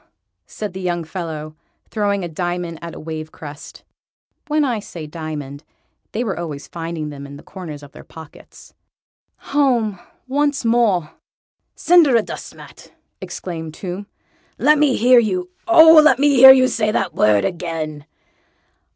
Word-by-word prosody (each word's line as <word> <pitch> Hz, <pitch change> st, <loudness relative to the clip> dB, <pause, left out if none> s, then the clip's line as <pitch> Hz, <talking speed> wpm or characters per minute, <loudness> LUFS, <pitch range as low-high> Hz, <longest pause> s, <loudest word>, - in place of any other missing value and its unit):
said 210 Hz, -3 st, -6 dB
the 190 Hz, -, -7 dB
young 175 Hz, -2 st, -2 dB
fellow, 160 Hz, -3 st, -6 dB, 0.3 s
throwing 200 Hz, -3 st, -1 dB
a -, -, -3 dB
diamond 175 Hz, 0 st, -4 dB
at 170 Hz, -1 st, -8 dB
a -, -, -9 dB
wave 155 Hz, 0 st, -7 dB
crest. 145 Hz, -1 st, -11 dB, 0.6 s
(When 300 Hz, 0 st, +1 dB
I 240 Hz, -5 st, -1 dB
say 170 Hz, -6 st, -9 dB
"diamond" 150 Hz, -2 st, -7 dB, 0.5 s
they 230 Hz, -, -2 dB
were 200 Hz, -7 st, -3 dB
always 155 Hz, -4 st, -6 dB
finding 165 Hz, -2 st, -5 dB
them 140 Hz, -1 st, -9 dB
in 140 Hz, 0 st, -11 dB
corners 155 Hz, -6 st, -9 dB
of 145 Hz, -, -13 dB
their -, -, -13 dB
pockets.) 160 Hz, -3 st, -15 dB, 0.8 s
"Home 240 Hz, -9 st, +1 dB, 0.3 s
once 285 Hz, 0 st, 0 dB
more!" 220 Hz, -9 st, +1 dB, 0.6 s
"Cinderadustmat!" 300 Hz, -10 st, 0 dB, 0.3 s
exclaimed 160 Hz, -3 st, -7 dB
Tomb. 190 Hz, +2 st, -7 dB, 0.5 s
"Let 300 Hz, 0 st, +3 dB
me 295 Hz, -4 st, +3 dB
hear 250 Hz, +1 st, +5 dB
you, 185 Hz, -5 st, -2 dB, 0.2 s
oh! 320 Hz, -2 st, +8 dB
let 265 Hz, -5 st, +5 dB
me 290 Hz, +2 st, +3 dB
hear 265 Hz, -1 st, +9 dB
you 260 Hz, -1 st, +5 dB
say 225 Hz, -4 st, -1 dB
the 195 Hz, -2 st, 0 dB
word 105 Hz, -2 st, +3 dB
again!" 160 Hz, -, -5 dB
180 Hz, 140 wpm, -19 LUFS, 155-245 Hz, 0.8 s, hear